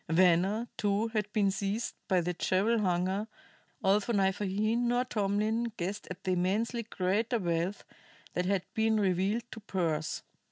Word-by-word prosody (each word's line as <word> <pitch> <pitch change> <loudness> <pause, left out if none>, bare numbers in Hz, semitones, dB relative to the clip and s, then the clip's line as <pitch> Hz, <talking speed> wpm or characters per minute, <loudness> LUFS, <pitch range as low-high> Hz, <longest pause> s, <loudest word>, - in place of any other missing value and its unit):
Venner, 185 +6 +3
too, 205 +2 +1
had 210 -2 -2
been 205 -2 +2
seized 200 +4 -2
by 185 -3 +3
the 180 +1 -1
jewel 200 +6 +2
hunger, 190 +2 0 0.6
although 205 +4 +3
neither 195 0 +1
he, 210 +4 +1
nor 245 +1 +1
Tomlin, 215 +2 0
guessed 190 +4 -3
at 180 - -8
the 185 - 0
immensely 205 +7 0
greater 215 +3 0
wealth 175 0 -1 0.5
that 180 0 0
had 195 -2 +1
been 220 0 +2
revealed 195 +4 +1
to - - -7
Pearse. 165 -7 -2
200 Hz, 150 wpm, -31 LUFS, 185-220 Hz, 0.6 s, Venner